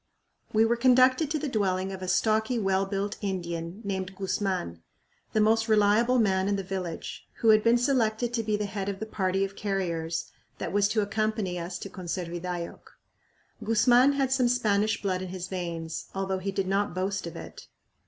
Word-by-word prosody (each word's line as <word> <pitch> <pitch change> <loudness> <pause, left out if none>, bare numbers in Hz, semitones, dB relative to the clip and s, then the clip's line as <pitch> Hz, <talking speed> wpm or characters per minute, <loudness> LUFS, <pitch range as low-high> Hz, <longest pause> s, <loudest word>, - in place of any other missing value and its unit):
We 220 +1 +4
were 235 +1 +2
conducted 255 +4 +4
to 310 - 0
the 300 - -3
dwelling 195 -5 0
of 190 -1 -7
a 185 - -4
stocky, 220 +5 +2
well 195 -2 +1
built 200 +1 -2
Indian 175 -1 -4
named 190 -1 -3
Guzman, 190 - -2 0.5
the 215 - +2
most 225 +1 +3
reliable 215 +3 +4
man 190 -4 +2
in 200 - +1
the 195 - -3
village, 180 -3 -5
who 225 - +2
had 215 -1 +6
been 235 +1 +5
selected 240 -2 +1
to 235 - +1
be 215 -1 0
the 210 - -2
head 200 -1 -3
of 195 -1 -4
the 220 - -3
party 195 -2 0
of 195 0 -8
carriers 170 -5 -2 0.3
that - - -4
was 205 0 +4
to 215 +1 +1
accompany 215 -3 -1
us 175 +1 -5
to - - -7
Conservidayoc. 175 -1 -5 0.8
Guzman 240 +5 +5
had 270 -2 0
some 260 -2 +3
Spanish 215 -3 +1
blood 185 -2 -1
in 185 - -4
his 185 0 -5
veins, 170 -3 -4
although 190 -1 -1
he 195 +1 -3
did 195 0 -1
not 195 -1 0
boast 190 0 -2
of 170 - -8
it. - - -10
200 Hz, 185 wpm, -28 LUFS, 185-220 Hz, 0.8 s, had